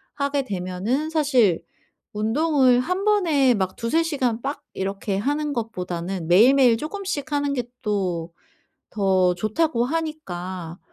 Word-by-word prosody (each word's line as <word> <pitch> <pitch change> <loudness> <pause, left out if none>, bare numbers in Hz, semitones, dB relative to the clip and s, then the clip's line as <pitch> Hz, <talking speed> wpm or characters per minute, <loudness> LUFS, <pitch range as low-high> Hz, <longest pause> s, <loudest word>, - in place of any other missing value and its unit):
하게 280 -1 0
되면은 200 - -2
사실 260 - +2 0.5
운동을 255 +3 +3
1 365 +8 -2
번에 320 -12 +3
막 190 -2 -2
2-3 280 +8 +1
시간 255 -8 -1
빡 280 +2 -4
이렇게 195 +1 -3
하는 290 +6 -1
것보다는 180 -6 -4
매일매일 240 +5 +6
쪼금씩 310 - -4
하는 285 -1 0
게 245 -3 -1 0.2
또 180 -6 -2 0.6
더 190 -3 +2
좋다고 235 - 0
하니까 185 - -4
240 Hz, 235 characters per minute, -23 LUFS, 190-290 Hz, 0.6 s, 매일매일